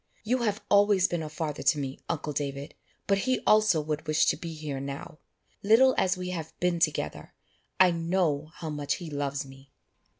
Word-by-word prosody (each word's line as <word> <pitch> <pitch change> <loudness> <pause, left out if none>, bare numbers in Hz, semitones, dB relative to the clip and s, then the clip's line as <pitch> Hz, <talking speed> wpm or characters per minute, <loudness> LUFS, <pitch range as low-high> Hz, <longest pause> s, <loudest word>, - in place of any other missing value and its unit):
You 245 +4 +1
have 215 -3 -1
always 200 -2 +4
been 175 -1 -2
a 155 - -5
father 150 -1 -4
to 155 - +3
me, 135 -2 -4
uncle 155 -2 -2
David, 140 0 -4 0.3
but 195 0 +2
he 255 +5 +1
also 215 -6 +4
would 150 +1 -4
wish 155 0 +3
to - - +2
be 165 -2 -7
here 150 -3 -5
now. 140 +2 -7 0.4
Little 235 +6 +5
as 185 0 +1
we 180 0 -4
have 165 -3 -6
been 175 -1 +1
together, 150 - -1 0.4
I 185 -1 +7
know 165 -3 0
how 160 -2 -5
much 145 -1 -2
he 170 -4 -8
loves 140 -1 -2
me." 135 0 -15
160 Hz, 190 wpm, -28 LUFS, 145-185 Hz, 0.4 s, I